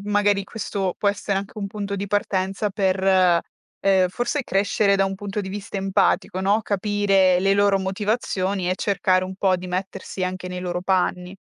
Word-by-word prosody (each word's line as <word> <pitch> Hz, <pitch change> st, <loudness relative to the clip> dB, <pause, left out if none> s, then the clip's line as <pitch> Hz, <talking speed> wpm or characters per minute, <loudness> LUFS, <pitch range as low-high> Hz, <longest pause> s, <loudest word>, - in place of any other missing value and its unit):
magari 205 Hz, -1 st, +2 dB
questo 195 Hz, -3 st, -3 dB
può 205 Hz, -, +2 dB
essere 200 Hz, -1 st, -1 dB
anche 200 Hz, +2 st, -8 dB
un 200 Hz, -, -3 dB
punto 200 Hz, 0 st, -4 dB
di 200 Hz, +1 st, -3 dB
partenza 195 Hz, 0 st, -1 dB
per, 190 Hz, -1 st, 0 dB, 0.8 s
ehm, 190 Hz, -2 st, +3 dB
forse 240 Hz, +9 st, -2 dB
crescere 200 Hz, -1 st, +2 dB
da 195 Hz, -, +3 dB
un 195 Hz, 0 st, -2 dB
punto 205 Hz, +1 st, -4 dB
di 190 Hz, -, -6 dB
vista 200 Hz, +1 st, -6 dB
empatico, 195 Hz, -1 st, +1 dB
no, 200 Hz, +3 st, +2 dB
capire 195 Hz, -2 st, +2 dB
le 195 Hz, +1 st, +3 dB
loro 200 Hz, -1 st, +3 dB
motivazioni 195 Hz, -1 st, -1 dB
e 185 Hz, -, +1 dB
cercare 185 Hz, -2 st, +1 dB
un 190 Hz, 0 st, -6 dB
po' 190 Hz, -1 st, +2 dB
di 180 Hz, -, -8 dB
mettersi 185 Hz, +1 st, -4 dB
anche 185 Hz, 0 st, -4 dB
nei 180 Hz, 0 st, -5 dB
loro 180 Hz, -1 st, -3 dB
panni. 180 Hz, 0 st, 0 dB
195 Hz, 180 wpm, -23 LUFS, 185-205 Hz, 0.8 s, ehm